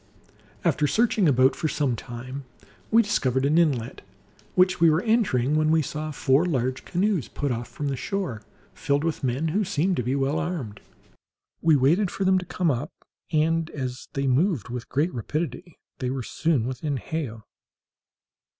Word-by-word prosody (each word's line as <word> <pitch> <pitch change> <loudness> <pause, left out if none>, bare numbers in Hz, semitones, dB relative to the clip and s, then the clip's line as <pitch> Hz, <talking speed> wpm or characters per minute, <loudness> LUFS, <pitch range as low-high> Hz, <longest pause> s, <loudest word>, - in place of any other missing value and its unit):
After 150 - +2
searching 220 -3 +3
about 130 0 +4
for 160 - -1
some 140 -5 0
time, 125 +4 -7 0.5
we 230 +1 +5
discovered 130 - +1
an 155 +4 +4
inlet, 135 -9 0 0.5
which 185 0 +4
we 165 - +7
were 160 +5 +2
entering, 185 - +2
when 155 0 +2
we 160 0 +3
saw 155 +3 -4
four 140 0 +2
large 130 -7 -1
canoes 185 - 0
put 145 -2 -3
off 120 0 -3
from 145 - -5
the 140 - -1
shore, 130 - -3 0.3
filled 140 +1 0
with 165 -3 -2
men 135 +5 0
who 205 +7 +1
seemed 185 -1 0
to - - +1
be 125 +3 -1
well 140 +3 0
armed. 160 - -4 0.8
We 160 -2 +5
waited 165 +9 +3
for 195 - -3
them 190 0 +4
to 180 - -7
come 175 -4 +1
up, 120 -3 -2 0.4
and, 165 +1 +1
as 130 -3 -5
they 140 0 -1
moved 135 - +1
with 125 -1 -6
great 155 +6 0
rapidity, 150 - -4 0.2
they 125 - -1
were 130 -1 -3
soon 150 -3 0
within 130 +3 -2
hail. 120 -6 -5
150 Hz, 170 wpm, -25 LUFS, 130-170 Hz, 0.8 s, we